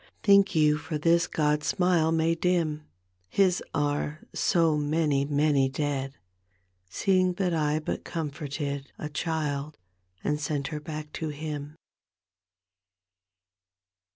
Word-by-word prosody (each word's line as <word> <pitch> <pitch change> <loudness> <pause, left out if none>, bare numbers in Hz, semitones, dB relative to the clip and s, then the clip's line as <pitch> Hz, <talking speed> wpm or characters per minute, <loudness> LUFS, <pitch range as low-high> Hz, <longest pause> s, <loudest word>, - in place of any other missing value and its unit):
Think 200 -3 +5
you 150 -1 +4
for 155 0 -4
this 170 +2 +3
God's 150 -1 0
smile 180 -4 +2
may 165 0 +2
dim 165 -3 0 0.4
{His 185 -3 +2
are 145 +1 -1
so 165 -4 +2
many, 150 -1 +1
many 145 -2 +2
dead) 135 -1 -2 0.7
Seeing 185 - +2
that 180 -1 -1
I 150 -2 +1
but 155 - -3
comforted 145 -3 -4
A 150 - -5
child 150 -2 -2 0.2
— 90 0 -39
and 150 0 0
sent 145 -2 -2
her 155 -2 -4
back 150 0 -7
to 160 - -3
Him 150 0 -5
150 Hz, 120 wpm, -27 LUFS, 145-165 Hz, 0.7 s, Think